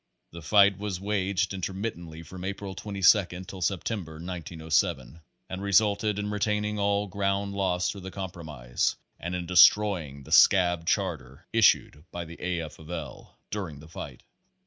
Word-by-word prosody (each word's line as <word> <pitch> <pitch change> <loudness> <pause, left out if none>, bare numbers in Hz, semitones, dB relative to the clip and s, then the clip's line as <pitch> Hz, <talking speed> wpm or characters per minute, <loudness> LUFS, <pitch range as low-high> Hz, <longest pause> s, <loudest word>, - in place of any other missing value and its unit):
The 85 - -9
fight 100 +3 +4
was 100 -3 -3
waged 100 -1 -1
intermit 95 +4 -3
tently 80 -1 -10
from 90 +3 -9
April 100 0 -5
22 95 -2 +2
till 95 +1 -9
September, 95 -2 -2
1907, 80 -4 -2 0.3
and 95 0 -6
resulted 100 +1 +2
in 105 0 -2
regaining 105 0 -1
all 100 0 +1
ground 100 +1 -1
lost 90 -3 0
through 100 - -9
the 95 - -7
compromise, 80 -11 -3 0.2
and 85 +2 -4
in 90 -1 -3
destroying 90 -5 +4
the - - -13
scab 90 -3 +5
charter 65 +7 -2
issued 100 -9 +3
by 85 -1 -6
the 85 +1 -12
A. 90 -1 -1
F. 80 -2 -9
of 80 0 -13
L. 80 -8 -7
during 90 -9 -4
the 75 - -13
fight. 80 - -9
95 Hz, 155 wpm, -27 LUFS, 85-100 Hz, 0.3 s, scab